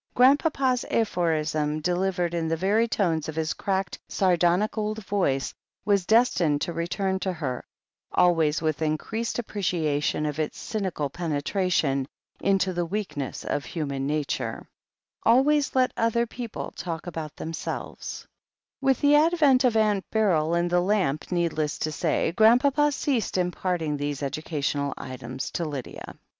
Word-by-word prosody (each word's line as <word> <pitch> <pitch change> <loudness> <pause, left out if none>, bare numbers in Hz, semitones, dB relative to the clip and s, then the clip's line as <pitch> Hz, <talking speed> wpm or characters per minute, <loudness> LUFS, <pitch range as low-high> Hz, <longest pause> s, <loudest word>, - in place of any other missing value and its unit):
Grandpapa's 265 -1 +3
aphorism, 155 -7 0
delivered 180 +1 0
in 165 -1 -1
the 165 0 0
very 205 +6 +2
tones 165 -8 0
of 155 - -6
his 160 -1 -1
cracked, 190 -1 -2
sardonic 180 +2 +2
old 215 -1 -3
voice, 160 -10 0 0.3
was 200 -3 +2
destined 185 -10 +3
to 170 - -3
return 190 +3 -1
to 190 0 -1
her, 145 -8 -4 0.5
always 165 -3 +3
with 155 -1 0
increased 190 +9 -2
appreciation 170 -10 -1
of 150 0 -3
its 155 - -2
cynical 190 -9 -2
penetration 155 -2 0 0.3
into 190 -1 +1
the 175 0 0
weakness 165 -7 -4
of 145 - -1
human 140 -5 -3
nature: 150 -1 -2 0.6
''Always 280 +5 +3
let 255 -1 +3
the - - -3
other 230 +1 +2
people 235 -1 -6
talk 165 -2 -5
about 160 -3 -6
themselves/' 165 0 -5 0.6
With 270 -2 +2
the 290 0 +5
advent 295 -4 +5
of 240 -3 +3
Aunt 210 -3 +1
Beryl 170 -7 +2
and 170 0 +1
the 175 0 +4
lamp, 180 -7 0
need 170 -2 +1
less 155 -1 -1
to 155 - -2
say. 160 +1 0
Grandpapa 260 - +4
ceased 265 -8 -1
imparting 175 -4 -1
these 145 -1 -3
educa 145 +1 -3
tional 140 -1 -1
items 130 0 -6
to 170 - -2
Lydia. 145 -5 -6
175 Hz, 145 wpm, -26 LUFS, 155-215 Hz, 0.6 s, the